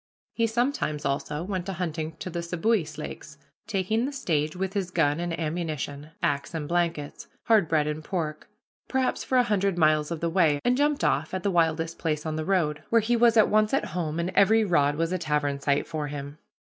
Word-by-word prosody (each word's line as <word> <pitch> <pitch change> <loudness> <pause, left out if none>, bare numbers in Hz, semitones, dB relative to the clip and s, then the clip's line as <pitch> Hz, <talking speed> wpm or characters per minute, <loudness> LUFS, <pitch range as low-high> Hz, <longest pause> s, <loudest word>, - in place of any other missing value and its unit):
He 230 -1 +1
sometimes, 225 - -1
also, 150 +3 -2
went 185 -1 -3
a - - -2
hunting 160 -3 -3
to 170 +4 -6
the 170 0 -3
Seboois 170 -2 0
Lakes, 150 -1 -8 0.3
taking 220 +4 0
the - - -4
stage, 155 - -1
with 190 +1 -3
his 195 -3 -1
gun 160 -4 +1
and 175 -1 -3
ammunition, 155 -3 -3
axe 145 +3 -1
and 150 -2 -3
blankets, 170 -4 -2 0.2
hard 215 -7 +4
bread 155 -1 +2
and 150 +1 -3
pork, 155 -4 -4 0.4
perhaps 260 -1 0
for 260 - +1
a 250 - +6
hundred 200 -5 0
miles 155 -2 +3
of 170 -2 -3
the 170 - -1
way, 160 -5 +3
and 245 - +4
jumped 290 +1 +1
off 155 +6 +1
at 185 - -3
the 200 - +1
wildest 165 -1 +1
place 155 -2 -1
on 155 -1 -2
the 155 - -2
road, 155 -6 +1
where 230 - +5
he 235 +3 +1
was 235 -1 +4
at 220 - +6
once 215 +3 +3
at - - 0
home, 165 -2 -2
and 170 +2 -1
every 215 +4 +4
rod 145 -6 +2
was 165 +2 -1
a 185 - -1
tavern 150 -3 0
site 140 0 +1
for 155 -2 -4
him. 145 +1 -7
170 Hz, 210 wpm, -26 LUFS, 150-195 Hz, 0.4 s, a